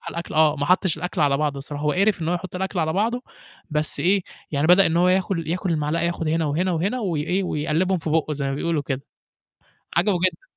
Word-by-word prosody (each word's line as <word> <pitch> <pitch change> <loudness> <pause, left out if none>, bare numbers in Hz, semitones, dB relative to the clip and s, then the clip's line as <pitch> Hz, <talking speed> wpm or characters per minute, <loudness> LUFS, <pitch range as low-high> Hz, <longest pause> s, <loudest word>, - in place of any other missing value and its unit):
على - - -5
الأكل 170 -2 -5
آه، 155 -1 +4
ما 145 - -2
حطّش 180 -2 +2
الأكل 180 +1 -4
على 140 -2 +3
بعضه 145 -1 -1
الصراحة، 145 +1 -6
هو 150 - +2
قِرِف 200 -1 +2
إن 160 - -1
هو 175 - +1
يحطّ 180 +1 -6
الأكل 190 0 -3
على 160 -1 +1
بعضه، 235 +5 0 0.5
بس 150 0 -1
إيه، 190 +2 +3 0.3
يعني 145 +1 +1
بدأ 180 +3 +6
إن 165 +1 0
هو 180 +1 +4
ياكل 185 -3 +1
ياكل 180 +1 -1
المعلقة 155 +1 0
ياخد 170 -2 -1
هنا 160 0 +1
وهنا 175 +5 0
وهنا 195 +10 -1
وي 175 -9 -1
إيه، 185 +4 0
ويقلِّبهم 170 +3 0
في 160 -1 -4
بُقّه 155 -1 +1
زي 140 -1 -3
ما 135 - -1
بيقولوا 160 0 -1
كده. 135 -1 -3 0.9
عجبه 180 +1 +3
جدًا. 175 -2 -3
165 Hz, 235 wpm, -23 LUFS, 150-185 Hz, 0.9 s, بدأ